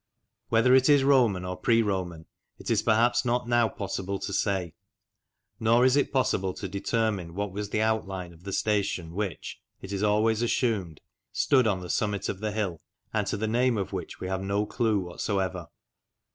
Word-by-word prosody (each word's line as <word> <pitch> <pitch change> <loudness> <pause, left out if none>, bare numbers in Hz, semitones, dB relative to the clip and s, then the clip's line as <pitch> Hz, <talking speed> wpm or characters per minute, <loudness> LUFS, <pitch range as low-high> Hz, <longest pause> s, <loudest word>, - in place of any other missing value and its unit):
Whether 115 +3 +4
it 130 +2 +5
is 145 -2 +6
Roman 120 -10 +3
or 90 0 -3
pre 115 +4 +2
Roman 90 -5 -3 0.3
it - - -5
is - - +3
perhaps 115 +2 +3
not 120 0 0
now 120 -2 +3
possible 95 0 -4
to 95 - -5
say. 95 -5 -1 0.9
Nor 115 +3 +4
is 130 0 +4
it 145 - +1
possible 95 -8 0
to 100 - -5
determine 100 -3 -2
what 100 0 -2
was 105 +1 -5
the 110 +1 0
outline 95 -5 -2
of 85 +1 -19
the 100 - -6
station 100 -5 -1
which 100 -1 -4 0.2
it 95 - -9
is 100 - -2
always 105 +2 +2
assumed 110 - -1 0.3
stood 130 -5 +3
on 95 -4 0
the 90 - -7
summit 105 -2 -1
of 95 - -4
the 110 0 -2
hill, 100 -6 -3 0.3
and - - 0
to - - -1
the 110 +2 -2
name 120 +1 +2
of 95 -5 -3
which - - -6
we 95 - -4
have 95 0 -2
no 100 +2 0
clue 110 -1 0
whatever. 90 -1 -3
105 Hz, 185 wpm, -27 LUFS, 95-115 Hz, 0.9 s, is